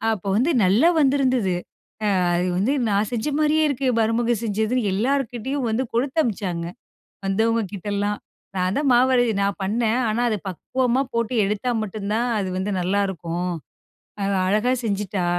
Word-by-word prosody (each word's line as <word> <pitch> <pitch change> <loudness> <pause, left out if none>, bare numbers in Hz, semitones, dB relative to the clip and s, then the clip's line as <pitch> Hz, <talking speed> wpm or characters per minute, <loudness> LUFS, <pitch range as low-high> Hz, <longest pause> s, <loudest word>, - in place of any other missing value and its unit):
அப்ப 200 - -13
வந்து, 265 +8 +2
நல்லா 210 - +5
வந்திருந்தது. 260 -8 +2 0.7
''அ - - +1
அது 180 +1 0
வந்து 215 +8 +1 0.2
நான் 205 +1 +1
செஞ்ச 235 +2 -2
மாரியே 310 +1 +3
இருக்கு, 270 -1 -1
மருமக 230 +2 +2
செஞ்சதுன்னு'' 220 +1 0
எல்லார்கிட்டயும் 255 +2 -1
வந்து 235 +4 0
கொடுத்தமிச்சாங்க, 225 - -1 0.6
வந்தவங்க 225 +4 +1
கிட்டலாம். 205 +1 -2 0.4
நான் 185 +1 0
தான் 290 0 +1
மாவரை 250 0 +4 0.2
நான் 200 -2 0
பண்ணேன். 225 +4 +1
ஆனா, 220 +3 0
அது 215 - 0
பக்குவமா 250 +7 0
போட்டு 235 +1 -1
எடுத்தா 210 +5 -1
மட்டுந்தான் 215 +3 -2
அது 195 -2 -2
வந்து 190 +2 -2
நல்லாருக்கும். 180 -2 -1 0.7
அவ 200 - 0 0.2
அழகா 215 +6 +2
செஞ்சுட்டா. 200 -3 -1
220 Hz, 135 wpm, -23 LUFS, 200-250 Hz, 0.7 s, நல்லா